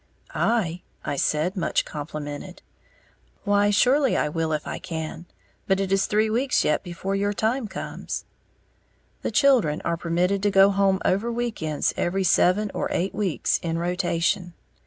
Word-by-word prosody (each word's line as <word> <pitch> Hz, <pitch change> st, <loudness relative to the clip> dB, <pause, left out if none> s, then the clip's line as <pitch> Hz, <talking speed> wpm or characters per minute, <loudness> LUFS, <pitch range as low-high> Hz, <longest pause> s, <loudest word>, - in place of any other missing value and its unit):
"I?" 185 Hz, -7 st, 0 dB, 0.2 s
I 145 Hz, -, -1 dB
said, 155 Hz, +7 st, 0 dB
much 180 Hz, -, 0 dB
complimented. 150 Hz, +3 st, -7 dB, 0.8 s
"Why, 205 Hz, 0 st, +3 dB
surely 260 Hz, +6 st, +3 dB
I 150 Hz, -, +1 dB
will 160 Hz, +1 st, -1 dB
if 150 Hz, -1 st, -2 dB
I -, -, -5 dB
can. 165 Hz, -1 st, -6 dB, 0.4 s
But 190 Hz, 0 st, +2 dB
it 195 Hz, -1 st, -1 dB
is 195 Hz, 0 st, +2 dB
three 215 Hz, +1 st, +2 dB
weeks 245 Hz, +5 st, +1 dB
yet 150 Hz, -, +1 dB
before 190 Hz, +2 st, -4 dB
your 205 Hz, +1 st, 0 dB
time 225 Hz, +3 st, 0 dB
comes:" -, -, -6 dB, 1.0 s
the -, -, -2 dB
children 235 Hz, -, +3 dB
are 170 Hz, 0 st, 0 dB
permitted 180 Hz, +4 st, 0 dB
to 205 Hz, -, +2 dB
go 195 Hz, 0 st, +6 dB
home 195 Hz, -1 st, +2 dB
over 210 Hz, +6 st, +1 dB
week 235 Hz, -3 st, -3 dB
ends 155 Hz, -2 st, 0 dB
every 190 Hz, +2 st, 0 dB
seven 190 Hz, +3 st, +3 dB
or -, -, -1 dB
eight 185 Hz, +3 st, -1 dB
weeks, 195 Hz, -5 st, 0 dB
in 165 Hz, -1 st, -2 dB
rotation. 175 Hz, 0 st, -1 dB
190 Hz, 155 wpm, -24 LUFS, 165-205 Hz, 1.0 s, go